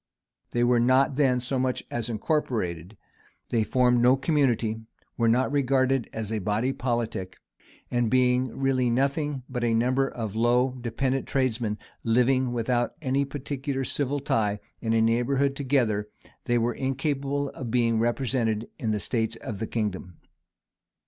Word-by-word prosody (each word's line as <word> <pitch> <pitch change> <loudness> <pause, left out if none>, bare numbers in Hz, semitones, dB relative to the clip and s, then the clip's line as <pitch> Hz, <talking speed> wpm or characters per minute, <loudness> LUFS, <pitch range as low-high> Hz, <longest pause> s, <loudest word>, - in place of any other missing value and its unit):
[*] - - -56
They 120 - 0
were 120 0 +4
not 130 +3 +3
then 130 -3 +3
so 130 +2 -2
much 130 0 -1
as 120 0 -2
incorporated; 110 - -2 0.5
they 115 -2 +2
formed 125 +1 +3
no 125 +2 +5
community; 130 -6 +1 0.3
were 115 - +1
not 125 +4 +2
regarded 135 -2 +1
as 110 -1 -4
a 110 - 0
body 105 +7 0
politic; 115 -8 -3 0.5
and 120 -2 +1
being 125 0 +3
really 130 -2 +1
nothing 140 +2 0
but 125 -2 -4
a 115 -1 +2
number 130 +4 +2
of 110 -4 -5
low, 120 +3 +3
dependent 130 +2 -2
tradesmen, 120 -6 0 0.3
living, 125 +2 +2
without 120 0 0
any 140 -1 0
particular 140 0 -4
civil 145 +2 -1
tie, 105 -7 0 0.2
in 115 -1 0
neighborhood 135 +4 +1
together, 120 -7 0 0.4
they 120 -1 +2
were 120 +1 +1
incapable 140 +1 -1
of 130 -3 -7
being 115 -1 +2
represented 115 -2 0
in 115 - -2
the 105 -1 0
states 115 +1 -1
of 110 -3 -7
the 110 - -3
kingdom. 95 -6 -3
125 Hz, 150 wpm, -26 LUFS, 115-135 Hz, 0.5 s, no